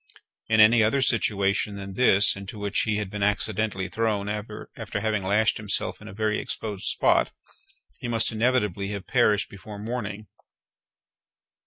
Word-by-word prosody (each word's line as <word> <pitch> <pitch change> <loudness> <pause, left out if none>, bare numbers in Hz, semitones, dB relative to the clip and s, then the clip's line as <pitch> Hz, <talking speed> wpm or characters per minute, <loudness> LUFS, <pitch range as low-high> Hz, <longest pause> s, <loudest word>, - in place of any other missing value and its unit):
In 110 0 +2
any 115 +2 +7
other 130 +5 +2
situation 100 -3 +1
than 100 -1 -7
this 100 -3 +4
(into 100 +2 -8
which 105 0 -1
he 110 -1 0
had 105 -3 -4
been 105 -1 -5
accidentally 105 -1 0
thrown 110 -3 -1
after 105 0 -6 0.3
having 110 -1 -1
lashed 105 +3 +2
himself 105 0 -1
in 105 - -11
a - - -8
very 110 +2 -1
exposed 105 -4 -5
spot) - - +2 0.7
he - - -5
must 115 -2 +3
inevitably 110 -4 0
have 100 -2 -5
perished 105 -4 +2
before 105 +1 -10
morning. 110 -1 -5
105 Hz, 150 wpm, -25 LUFS, 100-110 Hz, 0.7 s, any